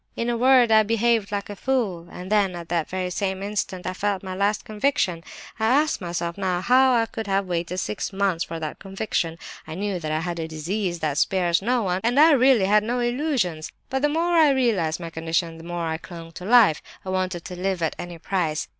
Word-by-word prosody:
In 235 +1 -1
a - - 0
word, 250 -1 +5
I 220 0 +7
behaved 225 -1 +1
like 200 -1 -3
a 205 - -7
fool, 200 -9 -1
and 180 +2 -8
then, 200 -4 +2
at 170 -1 -8
that 170 -2 -1
very 185 -1 -3
same 190 0 -2
instant, 200 -3 -3
I 185 - -2
felt 200 0 -2
my 190 -1 -5
'last 200 +3 0
conviction.' 210 -7 0 0.4
I 220 - +2
ask 290 +4 +2
myself 170 0 -3
now 185 -2 0
how 255 +4 +4
I 230 -1 +3
could 225 -1 -6
have 195 0 +1
waited 175 0 -3
six 195 +2 -3
months 195 -3 0
for 165 0 -6
that 155 -2 -5
conviction! 190 -4 -3 0.3
I 160 - -6
knew 195 0 -2
that 155 -2 -4
I 155 +1 0
had 170 0 -4
a 160 - -3
disease 170 +3 -3
that 150 -2 0
spares 175 -2 +2
no 240 +3 +1
one, 185 -1 -1
and 240 +4 +2
I 320 +2 +8
really 260 -6 +5
had 210 +2 +4
no 240 +3 -1
illusions; 240 - -1 0.2
but 265 0 0
the 295 - +3
more 330 +3 0
I 320 -3 +6
realized 225 - +1
my 165 -1 -7
condition, 165 0 -2
the - - -11
more 175 0 -4
I 160 0 -2
clung 165 -2 -10
to 180 - -9
life; 220 -8 +5 0.2
I - - -5
wanted 185 -2 -2
to 180 - -6
live 185 -1 -2
at 160 - -1
any 175 -1 -6
price. 165 -3 -2
190 Hz, 225 wpm, -24 LUFS, 170-230 Hz, 0.4 s, I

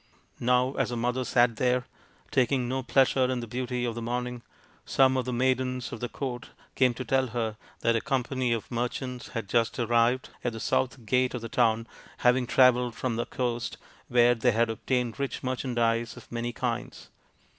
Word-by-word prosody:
Now 125 +2 +2
as - - +1
the 120 - -3
mother 125 +2 0
sat 120 -2 +3
there, 125 0 +1 0.5
taking 130 -1 +2
no 130 +2 -1
pleasure 130 0 +3
in 130 -1 -1
the 120 - -4
beauty 125 +1 -2
of 120 - -1
the 115 - -5
morning, 125 +1 -3 0.4
some 130 -1 +3
of 130 - 0
the 130 - -2
maidens 125 0 0
of - - -6
the 120 - -3
court 125 -4 -5 0.2
came 125 -2 +3
to 130 - -5
tell 130 +2 +2
her 115 -2 -2 0.3
that 115 0 +2
a 115 - +1
company 130 -1 -1
of 115 +1 -2
merchants 125 +1 -3
had 115 - -3
just 115 +2 +1
arrived 120 +2 +2
at 120 - -1
the 115 - -6
south 130 +1 -1
gate 125 +3 +2
of 125 - -4
the 115 - -5
town, 115 -1 +2 0.3
having 125 0 +3
travelled 125 -2 +4
from 125 -3 -2
the 120 - -2
coast, 120 -2 -2 0.3
where 120 0 +5
they 120 0 +2
had 115 +1 +2
obtained 125 +2 -2
rich 140 -1 -3
merchandise 120 -3 0
of - - -14
many 120 0 -2
kinds. 120 0 -4
125 Hz, 190 wpm, -28 LUFS, 115-130 Hz, 0.5 s, where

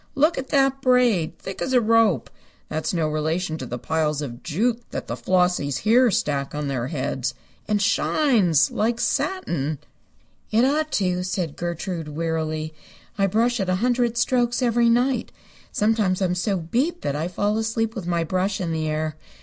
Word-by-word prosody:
Look 305 +4 +3
at 265 - -6
that 270 -1 +2
braid! 240 -11 +2
Thick 190 - -8
as 260 - -1
a 250 - +6
rope! 225 - +2 0.4
That's 155 0 -2
no 165 -3 0
relation 155 +2 -1
to 130 - -5
the 125 - -4
piles 150 +1 -1
of 120 -3 -7
jute 225 +9 0
that - - -5
the - - -4
Flossies 180 -6 +1
here 240 +3 +5
stack 145 -7 -1
on 150 -1 -2
their 130 -3 -2
heads. 135 -3 -2 0.3
And 210 0 +1
shines! 200 - +3
Like 230 +2 0
satin." 160 - -1 0.7
"It 225 +3 +3
ought 305 +3 +1
to," 180 -2 +1
said 180 -4 -3
Gertrude, 170 -1 -4
wearily. 155 0 -2 0.5
"I 195 - +4
brush 235 +5 +1
it 190 -2 -1
a 185 - +2
hundred 240 +2 +1
strokes 240 +1 +1
every 235 -1 +3
night. 245 +1 +1 0.4
Sometimes 210 -4 +1
I'm 185 -2 +1
so 190 +2 0
beat 255 - -1
that 140 - -1
I 155 +3 -1
fall 205 +4 0
asleep 225 0 -1
with 200 -7 -6
my 170 -1 +1
brush 185 +4 -1
in 175 -3 -2
the 160 -1 -1
air. 155 0 -2
185 Hz, 175 wpm, -23 LUFS, 155-235 Hz, 0.7 s, a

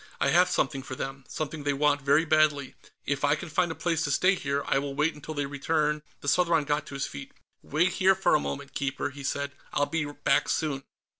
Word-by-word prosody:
"I - - +2
have 180 +2 +5
something 140 -5 0
for 130 -1 -7
them. 135 0 -6
Something 155 +2 -4
they 145 0 +1
want 145 0 +2
very 140 +4 +3
badly. 155 -3 +2 0.3
If 145 0 -1
I 145 +1 +4
can 155 +2 -7
find 175 +2 +1
a - - -5
place 165 +1 0
to - - -2
stay 185 +7 +4
here, 140 -5 -2
I 135 - +2
will 140 0 -4
wait 150 +3 +1
until 150 +1 -8
they 145 -1 -1
return 150 +2 0
" - - -35
The - - -8
Southron 170 0 +3
got 145 +1 -1
to 140 - -8
his 135 - -1
feet. 70 - -8 0.3
"Wait 160 +5 +1
here 190 +1 +4
for 190 - +2
a 150 - +5
moment, 140 -1 -5
Keeper," 140 0 -2
he 140 0 -10
said. 140 +1 -2 0.2
"I'll 145 - +2
be 160 0 -1
back 145 0 +1
soon." 150 -4 -1
145 Hz, 235 wpm, -28 LUFS, 140-160 Hz, 0.3 s, have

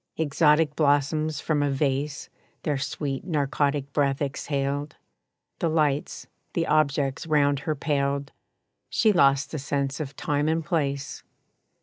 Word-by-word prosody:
Exotic 155 0 +3
blossoms 150 +1 +1
from 150 -2 0
a 145 - +1
vase 140 +1 -1 0.4
Their 145 -3 0
sweet 140 -1 -3
narcotic 145 -3 -1
breath 140 -2 +1
exhaled; 140 0 -2 0.6
The 165 - +1
lights, 150 -3 0 0.3
the 165 - +1
objects 145 -2 +1
round 145 -2 +3
her 155 +2 -2
paled 140 -1 -1 0.6
She 220 - +3
lost 140 -4 +3
the 155 - -3
sense 140 0 -2
of 150 -2 -5
time 145 0 0
and 160 0 0
place. 140 -5 -2
145 Hz, 125 wpm, -26 LUFS, 140-155 Hz, 0.6 s, Exotic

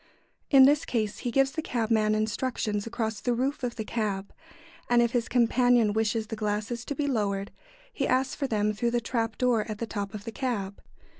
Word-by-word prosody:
In 270 -2 +8
this 290 +2 +4
case 215 -4 -2
he 245 - -2
gives 270 +2 +2
the 315 - -3
cabman 220 -5 +1
instructions 215 -1 -1
across 220 -2 -3
the 245 -1 0
roof 270 +4 -1
of 245 -2 -3
the 220 - -3
cab, 205 -4 -3 0.6
and 240 0 +5
if 235 -1 +3
his 240 -1 -1
companion 245 -2 +3
wishes 220 0 0
the 220 - -5
glasses 215 +2 -2
to 285 - -4
be 295 - -1
lowered, 200 -7 -1 0.4
he - - -1
asks 260 +2 +1
for 280 - -2
them 210 -2 +1
through 235 +3 0
the 240 0 +1
trap 225 -1 -2
door 245 -4 +2
at 215 - -4
the 230 - -3
top 205 -2 -5
of 205 - -7
the 230 - -6
cab. 215 -6 -3
230 Hz, 205 wpm, -27 LUFS, 215-250 Hz, 0.6 s, In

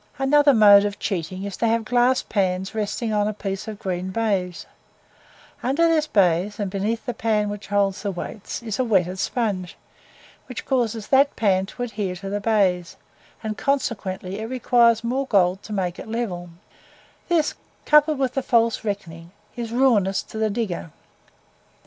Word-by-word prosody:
Another 285 +1 +4
mode 205 -2 +8
of 205 -1 -2
cheating 185 -1 -3
is 200 -1 -5
to 230 - +1
have 225 0 +1
glass 245 +2 +2
pans 190 -2 -1
resting 220 +1 -2
on 210 0 +2
a 215 - -3
piece 195 0 -4
of 215 -1 -6
green 185 -1 -3
baize; 190 -4 -1 1.0
under 285 +7 +2
this 315 -2 +2
baize, 190 - +2
and 200 -3 -2
beneath 210 +4 -2
the 245 - -2
pan 215 -3 0
which 205 0 -7
holds 200 -1 +1
the 205 - -2
weights, 200 +5 -6
is 220 -2 -4
a - - +3
wetted 190 -5 +1
sponge, 200 -6 -2 0.7
which 250 - -7
causes 230 -5 -1
that 275 +1 +4
pan 195 -3 +1
to 245 - -6
adhere 210 -6 -3
to 195 +2 -7
the 205 - -1
baize, 190 -5 +1 0.5
and 215 -1 -4
consequently 200 -8 -2
it 220 - -4
requires 235 -2 +3
more 260 +3 -1
gold 190 -3 +2
to - - -11
make 185 -4 -2
it - - -8
level; 210 -7 -4 0.8
this, 330 -3 +2 0.3
coupled 300 0 +5
with 265 -2 0
the 270 - 0
false 230 -3 +2
reckoning, 170 -6 -5 0.3
is 235 -2 -5
ruinous 230 -7 +2
to 220 - -8
the 220 0 +1
digger. 200 -6 -3
210 Hz, 165 wpm, -23 LUFS, 190-240 Hz, 1.0 s, mode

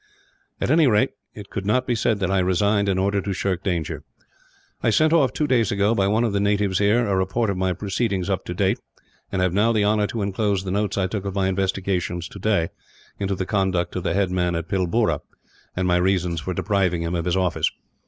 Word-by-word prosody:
At - - 0
any 155 -1 +5
rate, 105 -4 +3 0.2
it 105 -2 -10
could 100 - -3
not 125 +6 +1
be 125 - 0
said 110 -1 +1
that 95 0 0
I 95 - +2
resigned 100 +3 +2
in 95 - +1
order 100 +1 +1
to 100 +1 -3
shirk 95 -1 -2
danger. 85 -6 -2 0.8
"I - - +2
sent 155 +8 +3
off 140 -7 +4
two 150 +3 -1
days 120 -7 +2
ago, 100 +2 +2
by 100 -4 +1
one 110 +4 +2
of 115 -4 0
the 100 - +1
natives 100 -2 +1
here, 105 +4 +3
a 100 - 0
report 95 +4 0
of 95 - -3
my 95 0 0
proceedings 95 0 -2
up 95 -2 -1
to 90 - -4
that - - -12
date; 95 -1 +1 0.5
and 95 -1 0
have 90 -1 +1
now 105 +4 +3
the 105 -3 +2
honour 105 0 +2
to 110 -1 -3
inclose 100 -1 0
the 95 - -4
notes 100 0 -1
I 95 - +2
took 100 +1 -3
of 100 0 -4
my 95 -1 +1
investigations, 95 -2 -1
today, 100 -3 0 0.5
into 100 -1 -1
the 95 - -3
conduct 95 -3 0
of 90 - -1
the 90 - -1
headman 90 -3 +1
of 85 0 -3
Pilboora, 95 -3 +1 0.6
and 90 0 0
my 90 0 +3
reasons 90 -3 +1
for 90 +4 -4
depriving 95 -4 0
him 85 +1 -2
of 85 -2 -1
his 90 +1 +1
office. 90 -2 +1
95 Hz, 230 wpm, -23 LUFS, 90-105 Hz, 0.8 s, any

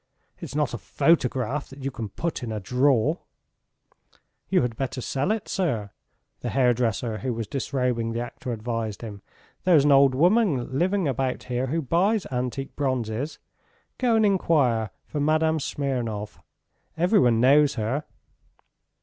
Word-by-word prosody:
It's - - -7
not 150 -3 0
a 120 - -4
photograph 135 - +1
that 135 0 -11
you 135 - -2
can 115 -4 -5
put 165 - -3
in 120 -2 -4
a 110 - -3
drawer!" 130 - +2 1.3
"You 185 -7 +3
had 120 -2 -2
better 130 +1 -3
sell 135 +5 -1
it, 220 -1 -1
sir," 115 - -1 0.5
the - - -4
hairdresser 120 -3 +1
who 130 -3 -2
was 115 -1 -3
disrobing 125 -2 -1
the 115 - -2
actor 120 +1 -6
advised 115 -1 -4
him. 100 -3 -7 0.4
"There's 165 -6 +5
an 145 - +5
old 135 -1 +6
woman 170 - +2
living 190 -1 +1
about 130 -1 -1
here 125 +1 -2
who 160 +4 -1
buys 190 - +1
antique 125 +1 -3
bronzes. 130 0 -2 0.6
Go 245 -3 +3
and 220 -1 +4
enquire 140 - +2 0.2
for 150 - -4
Madame 155 +2 +2
Smirnov... 120 -8 -3 0.6
everyone 170 - +4
knows 140 +3 +5
her." 125 +6 -2
130 Hz, 145 wpm, -25 LUFS, 120-155 Hz, 1.3 s, old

